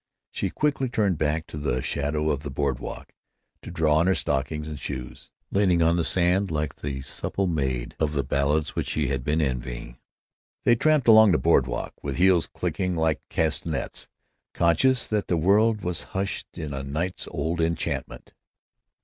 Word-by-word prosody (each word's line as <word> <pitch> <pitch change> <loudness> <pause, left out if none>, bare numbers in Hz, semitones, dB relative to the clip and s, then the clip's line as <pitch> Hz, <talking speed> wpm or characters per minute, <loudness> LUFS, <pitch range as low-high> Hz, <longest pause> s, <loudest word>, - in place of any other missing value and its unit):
She - - -2
quickly 140 -3 0
turned 100 -8 +1
back 80 +1 0
to 75 - -8
the 65 -4 -1
shadow 75 +2 -1
of 70 -2 -2
the 75 - -6
board 65 -1 -1
walk, - - -8 0.5
to - - -9
draw 80 -2 +2
on 85 +3 +3
her 95 - +3
stockings 75 +2 -2
and 75 -2 -6
shoes, 60 -2 -7 0.2
kneeling 90 -4 +3
on 85 +1 +3
the 85 - +1
sand 90 +4 +2
like 75 -2 -2
the 70 -2 -4
simple 85 +8 -2
maid 65 -8 -2
of 75 -1 0
the 70 -2 0
ballads 70 +3 0
which - - -2
she - - 0
had 65 -2 -2
been 75 +4 +1
envying. 60 -3 -4 0.6
They 120 - +5
tramped 150 +1 +2
along 110 -3 +8
the - - +4
board 75 -6 +3
walk, - - -4
with 70 -2 -4
heels 90 -2 +4
clicking 90 -2 -2
like 80 -1 +1
castanets, 80 -2 -2 0.5
conscious 110 +10 +3
that 105 -2 -1
the 85 - +1
world 105 +6 +3
was 90 -1 -2 0.2
hushed 95 +1 -2
in 75 -2 -4 0.2
night's 90 +5 -3
old 85 +1 -2
enchantment. 80 0 -3
80 Hz, 175 wpm, -25 LUFS, 70-95 Hz, 0.6 s, along